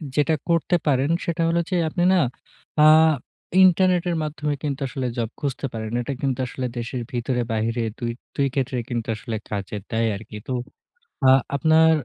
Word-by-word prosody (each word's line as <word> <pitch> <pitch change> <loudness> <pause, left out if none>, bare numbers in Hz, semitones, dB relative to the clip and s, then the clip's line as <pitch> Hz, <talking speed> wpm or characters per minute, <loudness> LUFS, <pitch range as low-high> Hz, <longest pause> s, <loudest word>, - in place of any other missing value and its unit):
যেটা 150 +2 +3 0.2
করতে 170 +1 +2
পারেন 135 0 +2 0.2
সেটা 170 0 -1
হলো 170 +1 +2
যে 185 - 0
আপনি 175 +2 -1
না - - +4 0.6
আ - - +7 0.8
ইন্টারনেটের 180 -1 +4
মাধ্যমে 150 -1 -2
কিন্তু 140 -2 -2
আসলে 130 0 -3
জব 115 -2 -1
খুঁজতে 140 -1 -3
পারেন। 110 -1 -4
এটা 130 +3 -3
কিন্তু 135 -3 -1
আসলে 130 +1 -4
দেশের 120 +1 -3
ভিতরে 125 0 -1
বাহিরে 115 +2 0 0.2
২ 120 -2 -2 0.2
২ 140 - +2
ক্ষেত্রেই 130 -3 -1
কিন্তু 120 -3 -3
আসলে 110 +1 -5
কাজে 100 0 -4
দেয় 115 0 +1
আরকি। 105 +1 -9
তো - - -4 1.1
আপনার 160 +3 +5
135 Hz, 160 wpm, -23 LUFS, 115-160 Hz, 1.1 s, আ